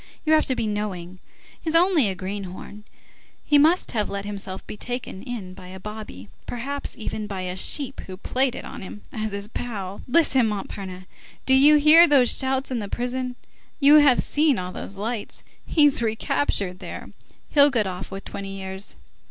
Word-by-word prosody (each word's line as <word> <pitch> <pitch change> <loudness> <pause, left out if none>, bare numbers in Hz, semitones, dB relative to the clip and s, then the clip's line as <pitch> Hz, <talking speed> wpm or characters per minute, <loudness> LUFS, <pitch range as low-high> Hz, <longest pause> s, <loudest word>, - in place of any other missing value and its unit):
You 315 - +3
have 310 - +4
to 260 - 0
be 230 - -2
knowing. 190 -4 -4 0.4
He's 320 0 -2
only 335 - +4
a 190 - -3
greenhorn. 195 +2 -7 0.6
He 295 -1 +5
must 325 +5 +3
have 215 -3 -1
let 200 0 -4
himself 195 -2 -6
be - - -8
taken 245 -3 -5
in 225 -8 -6
by 185 -1 -12
a 190 +1 -9
bobby, 210 - -8 0.2
perhaps 280 +4 -5
even 215 -2 -4
by 195 -2 -5
a 180 0 -4
sheep 270 +7 +2
who 185 -1 -8
played 255 +5 0
it - - -7
on - - -8
him 200 +2 -9
as 215 -2 -3
his 200 0 -4
pal. 205 -5 -5
Listen, 265 -4 +3
Montparnasse, 195 -3 -6 0.4
do 265 - +3
you 285 +3 +7
hear 310 +3 +8
those 270 -4 +4
shouts 265 0 0
in 245 - -1
the 205 - -4
prison? 250 +2 -3 0.4
You 290 +1 +7
have 285 -4 +5
seen 295 -2 +2
all 180 0 -4
those 195 +1 -6
lights. 220 +2 -4 0.2
He's 295 -5 +4
recaptured, 215 -4 0
there! 180 -3 -8 0.4
He'll 285 -1 +6
get 230 -6 +1
off 185 0 -5
with 195 0 -8
twenty 195 0 -6
years. 190 +1 -5
215 Hz, 180 wpm, -24 LUFS, 195-270 Hz, 0.6 s, hear